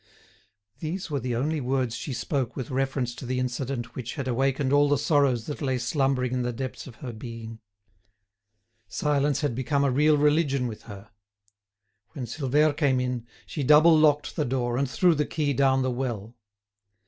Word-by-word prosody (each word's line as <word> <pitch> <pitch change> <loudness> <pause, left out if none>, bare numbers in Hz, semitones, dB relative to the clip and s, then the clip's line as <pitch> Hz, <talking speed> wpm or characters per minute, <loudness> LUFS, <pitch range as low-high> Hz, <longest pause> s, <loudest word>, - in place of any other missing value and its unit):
These 170 +2 -4
were 140 - 0
the 125 -1 -2
only 150 +5 -1
words 125 -2 -1
she 130 +4 -5
spoke 130 -1 -2
with 130 -2 -5
reference 130 -2 -1
to 125 - -10
the 125 +1 -2
incident 125 0 -3
which 125 -2 -6
had 140 -4 -4
awakened 135 +2 +1
all 145 0 +5
the 145 - +3
sorrows 135 -5 +2
that 150 - -6
lay 130 -3 0
slumbering 125 0 0
in 125 - 0
the 125 0 -1
depths 130 +3 -6
of 125 - -11
her 120 - -5
being. 115 0 -8 1.3
Silence 145 -1 0
had 145 -5 0
become 140 +3 0
a 140 - +2
real 150 +3 +4
religion 145 -3 +2
with 110 -3 -5
her. 100 +1 -10 1.0
When 135 -6 -5
Silvère 145 +4 +1
came 140 -4 +2
in, 125 -2 -3 0.2
she 150 - -5
double 150 +4 +6
locked 150 -1 +3
the 150 - 0
door, 120 -2 -1
and 135 +1 0
threw 175 +6 +3
the 150 -1 +1
key 145 -1 -1
down 135 0 +3
the 130 - 0
well. 120 -3 -4
135 Hz, 180 wpm, -26 LUFS, 125-145 Hz, 1.3 s, double